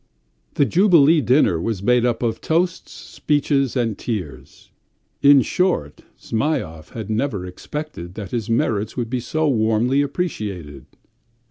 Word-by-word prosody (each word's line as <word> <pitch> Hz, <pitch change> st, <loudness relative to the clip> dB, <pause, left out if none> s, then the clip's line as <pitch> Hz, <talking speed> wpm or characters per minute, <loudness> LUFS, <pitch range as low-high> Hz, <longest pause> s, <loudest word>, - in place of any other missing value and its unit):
The 145 Hz, -, +3 dB
jubilee 165 Hz, -3 st, +5 dB
dinner 125 Hz, -, +3 dB
was 100 Hz, -1 st, -3 dB
made 125 Hz, +2 st, +3 dB
up 120 Hz, 0 st, -1 dB
of 115 Hz, -1 st, -1 dB
toasts, 175 Hz, +2 st, -1 dB
speeches, 140 Hz, -3 st, -1 dB
and 115 Hz, -4 st, 0 dB
tears. 75 Hz, -, -6 dB, 0.5 s
In 140 Hz, -2 st, +6 dB
short, 175 Hz, -, -1 dB, 0.2 s
Zhmyhov 110 Hz, -, -3 dB
had 110 Hz, -2 st, -6 dB
never 110 Hz, -4 st, -1 dB
expected 90 Hz, -, -7 dB
that 100 Hz, -4 st, -7 dB
his 115 Hz, -3 st, -3 dB
merits 110 Hz, -1 st, 0 dB
would 120 Hz, -2 st, -3 dB
be 130 Hz, -, 0 dB
so 155 Hz, +6 st, -1 dB
warmly 115 Hz, +2 st, +2 dB
appreciated. 105 Hz, -, -4 dB
120 Hz, 130 wpm, -21 LUFS, 105-145 Hz, 0.5 s, In